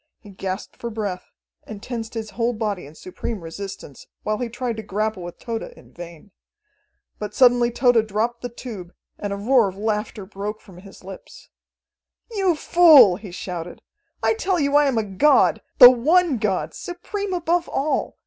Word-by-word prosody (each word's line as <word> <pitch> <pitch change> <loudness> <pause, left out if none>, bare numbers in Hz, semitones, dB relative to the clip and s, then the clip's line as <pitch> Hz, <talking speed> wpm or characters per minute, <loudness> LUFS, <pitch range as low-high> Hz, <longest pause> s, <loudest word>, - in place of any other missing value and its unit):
He 205 - -14
gasped 190 0 -6
for 235 - -5
breath, 205 -5 -5 0.3
and 210 -2 -10
tensed 230 -2 -6
his 220 -2 -5
whole 235 +2 -1
body 210 -8 -3
in 150 - -15
supreme 185 +5 -6
resistance, 165 -4 -9 0.2
while 215 0 -2
he 245 -2 -3
tried 240 -1 -4
to - - -4
grapple 215 0 -3
with 175 0 -8
Tode 230 -2 -5
in - - -13
vain. 170 +2 -11 0.9
But 210 0 -6
suddenly 245 -2 +5
Tode 240 -2 +2
dropped 225 +3 -2
the 245 - -5
tube, 215 -7 -9 0.2
and 205 - -4
a - - -2
roar 230 0 +3
of 190 - -12
laughter 210 -1 -3
broke 205 +2 -6
from 185 -4 -16
his 195 0 -15
lips. 190 0 -12 0.8
"You 385 -6 +1
fool!" 300 - +6
he 200 0 -10
shouted. 175 -1 -7 0.4
"I - - +3
tell 385 -5 -1
you 280 -1 +1
I 295 0 +5
am 265 -4 0
a 220 - +1
god, 210 +9 +3 0.2
the 250 -3 +11
one 300 +3 +2
god, 185 -7 -1
supreme 385 +3 -6
above 345 -1 0
all. 290 +3 -2
220 Hz, 175 wpm, -22 LUFS, 195-255 Hz, 0.9 s, the